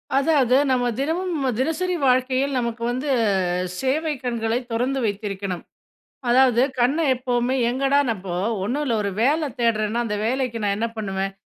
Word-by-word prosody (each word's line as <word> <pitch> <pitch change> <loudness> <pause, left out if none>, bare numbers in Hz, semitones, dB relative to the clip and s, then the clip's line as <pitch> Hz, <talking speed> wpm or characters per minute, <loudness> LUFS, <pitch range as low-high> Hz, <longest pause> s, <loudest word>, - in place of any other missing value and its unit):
அதாவது, 275 -3 +3
நம்ம 245 -1 +2
தினமும் 325 0 -1
தினசரி 355 +6 0
வாழ்க்கையில், 260 +2 +2
நமக்கு 235 -1 -2
வந்து 260 +4 -3 0.7
சேவை 300 +4 0
கண்களை 235 -1 -1
தொறந்து 255 +4 0
வைத்திருக்கணும். 200 -3 -3 0.7
அதாவது, 250 -1 +5 0.2
கண்ண 260 +6 +3 0.2
எப்பவுமே 250 0 0 0.2
எங்கடானப்போ, 250 -9 0 0.3
1 270 +7 -1
இல்ல. 235 -4 +1
ஒரு 200 - -1
வேல 295 +3 +2
தேடுறேன்னா, 230 0 +1
அந்த 210 -2 -2
வேலைக்கு 245 -2 -1
நான் 200 -1 +1
என்ன 230 +1 -1
பண்ணுவேன். 195 -2 -3
250 Hz, 130 wpm, -23 LUFS, 225-275 Hz, 0.7 s, அதாவது